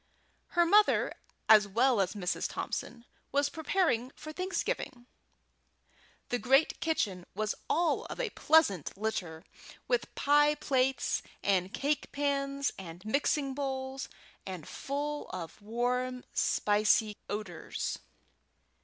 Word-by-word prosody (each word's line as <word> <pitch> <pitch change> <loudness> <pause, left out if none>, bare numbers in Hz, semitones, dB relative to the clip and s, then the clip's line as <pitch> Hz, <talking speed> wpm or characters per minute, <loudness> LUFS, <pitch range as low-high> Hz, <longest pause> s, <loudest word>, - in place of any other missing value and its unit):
Her 345 - +6
mother, 415 +4 +4 0.3
as 215 -2 +7
well 235 +2 +3
as 185 - 0
Mrs. 180 -3 -1
Thompson, 235 0 -5 0.3
was 285 0 +2
preparing 315 -7 0
for 310 - -8
Thanksgiving. 365 - -3 1.2
The 245 - 0
great 270 +5 +3
kitchen 200 - -1
was 215 +1 0 0.2
all 340 +1 +2
of - - -7
a 475 -4 -1
pleasant 205 - +3
litter 180 -7 -3 0.4
with - - 0
pie 295 +1 +4
plates 265 -3 +1 0.2
and 190 -2 +2
cake 290 +1 -1
pans 280 -1 0
and 175 0 -9
mixing 275 +3 +1
bowls, 265 -1 -4 0.3
and 185 -5 -7
full 290 +2 -4
of 180 +1 -7
warm, 250 +3 -1
spicy 210 +1 +2
odours. 205 -5 -4
255 Hz, 110 wpm, -31 LUFS, 210-290 Hz, 1.2 s, as